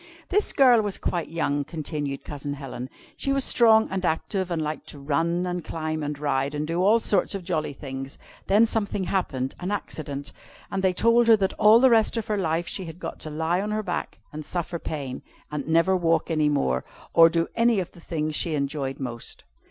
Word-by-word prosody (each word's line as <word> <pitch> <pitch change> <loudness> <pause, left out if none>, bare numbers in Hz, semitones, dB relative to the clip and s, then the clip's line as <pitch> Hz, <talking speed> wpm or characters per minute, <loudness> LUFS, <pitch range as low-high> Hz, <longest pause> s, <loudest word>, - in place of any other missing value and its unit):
"This 415 +2 +2
girl 250 -4 +6
was 205 -2 -2
quite 170 -2 -2
young," 145 -3 0
continued 150 -2 -4
Cousin 145 -1 -5
Helen; 130 -2 -7 0.3
"she 275 - -2
was 275 -1 +2
strong 220 -3 +5
and 190 -1 -2
active, 185 +3 -1
and 170 -2 -1
liked 155 0 -4
to - - -9
run, 165 +5 0
and 180 -1 -3
climb, 155 0 -3
and 145 0 -3
ride, 140 0 -1
and 150 +1 -2
do 165 +2 -2
all 215 +4 +5
sorts 200 -3 +1
of 195 - -5
jolly 165 -5 -1
things. 135 -1 -7 0.3
One 205 +3 +5
day - - +6
something 205 -3 -1
happened 135 -9 -1
an 180 - -3
accident 150 -8 -4 0.4
and 195 - -1
they 190 -1 +3
told 230 +4 +4
her 225 - +8
that 195 -3 0
all 215 +2 +6
the 260 0 +5
rest 225 0 +3
of 225 - -2
her 210 - -1
life 165 -1 0
she 190 - -4
had 165 0 -9
got - - -6
to 155 - -6
lie 160 +4 0
on 210 - -3
her 215 0 -1
back 180 -3 -4 0.2
and 155 +1 -6
suffer 170 +1 -3
pain, 140 -6 -5 0.3
and 150 -2 -4
never 165 +4 +3
walk 165 -2 +1
any 155 -2 +2
more, 65 - 0 0.3
or 165 0 +8
do 165 0 0
any 230 -2 +3
of 180 - -4
the - - -16
things 155 -2 -3
she 155 +1 0
enjoyed 140 -1 -2
most." 120 -3 -5
165 Hz, 215 wpm, -25 LUFS, 150-195 Hz, 0.4 s, her